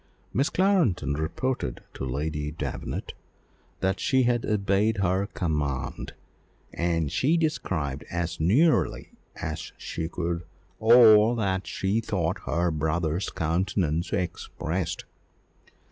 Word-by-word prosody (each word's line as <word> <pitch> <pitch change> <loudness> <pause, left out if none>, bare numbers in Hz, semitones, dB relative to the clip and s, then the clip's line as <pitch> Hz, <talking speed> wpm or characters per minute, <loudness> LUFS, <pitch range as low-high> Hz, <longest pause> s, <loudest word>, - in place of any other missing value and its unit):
Miss 135 +4 +2
Clarendon 180 - +2
reported 80 - -2
to - - -6
Lady 75 +3 -2
Davenant 75 -4 -5 0.7
that 95 +1 +1
she 130 -1 +3
had 120 -1 +1
obeyed 105 +1 +2
her 95 +1 +1
command, 75 -9 -2 0.6
and 85 -4 0
she 155 +6 +2
described 80 - -1
as 85 -1 -3
nearly 130 - +2 0.2
as 80 +1 -5
she 80 0 -4
could 85 -1 -2 0.4
all 110 0 +7
that 95 -4 -1
she 95 +3 0
thought 90 -7 -1
her 85 +2 +1
brother's 80 +3 -1
countenance 85 0 0
expressed. 90 -3 -3
90 Hz, 105 wpm, -26 LUFS, 80-110 Hz, 0.7 s, all